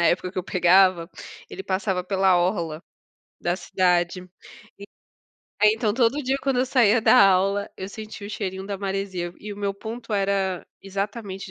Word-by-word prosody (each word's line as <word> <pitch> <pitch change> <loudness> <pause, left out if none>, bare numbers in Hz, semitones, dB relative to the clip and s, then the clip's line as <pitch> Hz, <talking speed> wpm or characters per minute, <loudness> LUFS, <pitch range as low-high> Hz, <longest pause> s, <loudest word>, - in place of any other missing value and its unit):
na - - +2
época 180 +1 0
que - - -4
eu 185 - -1
pegava, 185 -1 +4 0.4
ele 385 - -7
passava 190 - -1
pela 190 0 +2
orla 175 -3 -1 0.6
da 175 +1 -1
cidade, 180 -1 +1
e 180 0 -18 1.2
aí 210 - +6
então 220 -2 -1
todo 250 +4 +2
dia 265 +1 0
quando 270 -2 0
eu 255 - +2
saía 245 -3 +4
da 225 - +5
aula, 195 +2 +1
eu 190 - -6
sentia 215 0 -9
o - - -8
cheirinho 190 -2 -4
da 200 -1 -4
maresia, 190 -3 -3
e 210 0 -7
o 200 - -10
meu 200 -1 -2
ponto 225 +3 -8
era 195 -2 0 0.2
exatamente 195 0 -5
195 Hz, 170 wpm, -24 LUFS, 185-210 Hz, 1.2 s, aí